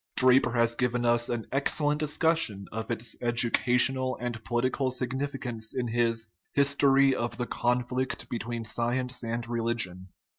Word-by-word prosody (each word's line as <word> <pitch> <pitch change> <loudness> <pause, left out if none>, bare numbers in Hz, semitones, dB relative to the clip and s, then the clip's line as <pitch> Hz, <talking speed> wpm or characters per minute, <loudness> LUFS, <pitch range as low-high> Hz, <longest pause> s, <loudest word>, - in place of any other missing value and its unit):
Draper 130 -1 +5
has 115 -1 +2
given 125 0 -1
us 120 0 +2
an 120 -2 -3
excellent 145 +2 +1
discussion 150 -9 +1
of 110 +2 -5
its 115 -1 -3
educational 125 +2 +2
and 120 -2 -5
political 130 +3 0
significance 125 -3 -3
in 125 -2 -2
his 115 -1 0 0.3
His 140 0 +4
tory 135 -1 +4
of 120 -2 -3
the 125 - -2
Conflict 125 +2 -2
between 115 0 -4
Science 125 +3 -1
and 115 0 -3
Religion. 115 -6 -2
120 Hz, 140 wpm, -28 LUFS, 115-130 Hz, 0.3 s, Draper